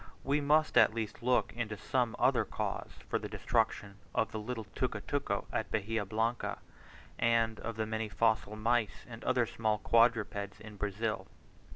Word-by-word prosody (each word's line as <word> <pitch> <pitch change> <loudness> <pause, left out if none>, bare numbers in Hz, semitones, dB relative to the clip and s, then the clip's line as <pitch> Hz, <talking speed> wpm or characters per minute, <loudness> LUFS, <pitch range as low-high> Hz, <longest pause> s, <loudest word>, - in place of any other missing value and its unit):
We 145 +2 +1
must 155 +2 +4
at 110 - +5
least 115 +1 -4
look 125 +1 +2
to 110 -3 -4
some 120 +1 0
other - - +4
cause - - -3 0.2
for - - 0
the - - -6
destruction 105 -4 0 0.2
of 110 - +1
the 110 - -3
little 110 0 -4
tucutuco - - -1
at - - -1
Bahia 110 0 -1
Blanca, 110 +4 -1 0.6
and 115 -1 +2
of 115 0 -4
the 110 0 -1
many 110 0 -2
fossil 110 0 +1
mice 115 0 0
and 115 -1 -9
other 125 -2 +2
small 110 -1 0
quadrupeds 105 -3 +2
in 110 -1 -11
Brazil. 105 +2 -2
110 Hz, 160 wpm, -32 LUFS, 105-115 Hz, 0.6 s, at